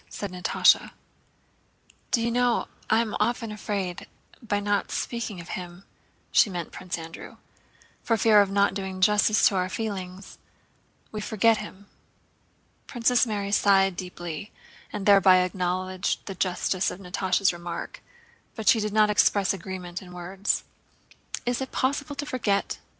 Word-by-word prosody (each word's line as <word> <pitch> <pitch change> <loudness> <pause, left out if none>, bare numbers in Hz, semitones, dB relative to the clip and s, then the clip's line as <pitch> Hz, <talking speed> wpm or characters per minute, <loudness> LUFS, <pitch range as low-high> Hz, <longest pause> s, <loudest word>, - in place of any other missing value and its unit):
said 200 -3 -6
Natásha. 180 0 +3 1.2
"Do 230 - +1
you 235 - 0
know, 245 0 +1 0.2
I 220 +1 +4
am 220 -2 -3
often 230 +1 0
afraid 200 -4 -3
that - - -10 0.3
by 210 -4 -1
not 205 0 0
speaking 230 -5 -3
of 170 - -10
him" 180 -1 -7 0.5
(she 215 - +5
meant 175 -3 -5
Prince 180 -1 -5
Andrew) 165 0 -10 0.6
"for 230 - +1
fear 215 0 +6
of 200 - +1
not 200 -1 +2
doing 190 -1 -5
justice 210 +2 +4
to 200 - 0
our 180 0 0
feelings, 190 -3 -6 0.7
we 215 - -5
forget 220 +1 +3
him." 200 -1 -9 1.0
Princess 245 0 +2
Mary 200 -2 -2
sighed 195 -2 +4
deeply 175 0 -6 0.4
and 205 -2 -5
thereby 195 -2 +6
acknowledged 185 +1 -2
the 195 - -5
justice 185 +1 0
of 180 - -7
Natásha's 185 0 +1
remark, 170 0 -7 0.5
but 220 -2 -6
she 230 - +6
did 210 -1 -2
not 215 -1 +4
express 200 -1 +3
agreement 185 -1 -6
in 180 -2 -12
words. 185 +3 -2 0.8
"Is 245 +1 -1
it 265 - -4
possible 285 +2 -1
to 290 - -4
forget?" 220 -8 -1
200 Hz, 145 wpm, -26 LUFS, 185-215 Hz, 1.2 s, fear